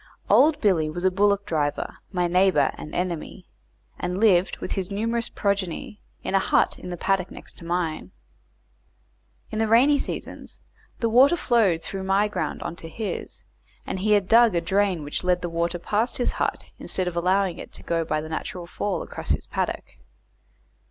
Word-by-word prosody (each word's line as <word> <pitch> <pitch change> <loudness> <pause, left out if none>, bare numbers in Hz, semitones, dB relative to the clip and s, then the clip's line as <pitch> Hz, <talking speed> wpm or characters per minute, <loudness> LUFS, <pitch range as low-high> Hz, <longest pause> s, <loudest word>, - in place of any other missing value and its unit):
Old 305 0 +5
Billy 170 -7 +2
was 175 +4 -4
a 185 - +4
bullock 200 +1 +2
driver, 145 -3 -2
my 180 -2 0
neighbour 180 -4 +3
and 150 - -9
enemy, 180 +1 -3 0.5
and 180 +2 -2
lived, 195 -4 +4
with - - -6
his 190 -1 -2
numerous 230 +3 -1
progeny, 200 0 -2 0.2
in - - -3
a 195 - +5
hut - - +2
in - - -8
the 175 - -5
paddock 190 0 0
next - - -10
to 170 - -11
mine. 165 - -2 1.4
In 215 - -3
the 220 - +2
rainy 265 +6 +5
seasons - - -6 0.4
the 230 - +2
water 260 +8 +6
flowed 210 - +2
through 195 - -5
my 195 +2 +2
ground 210 - -3
on 170 - -4
to 165 - -8
his, 205 +1 -5 0.4
and 190 - -3
he 210 +3 +2
had 200 -3 +3
dug 230 -2 +6
a 170 - +2
drain 190 -1 +1
which 145 +4 -3
led 180 0 +1
the 175 - -2
water 170 +1 -1
past 215 +7 0
his 245 - +1
hut, - - -3
instead 185 -1 -2
of 175 - -3
allowing 185 +1 +1
it - - -9
to - - -7
go 165 -1 0
by 155 -1 -1
the 155 - -8
natural 170 +2 -5
fall 190 +2 -3
across - - -8
his - - 0
paddock. - - -2
185 Hz, 185 wpm, -25 LUFS, 170-205 Hz, 1.4 s, water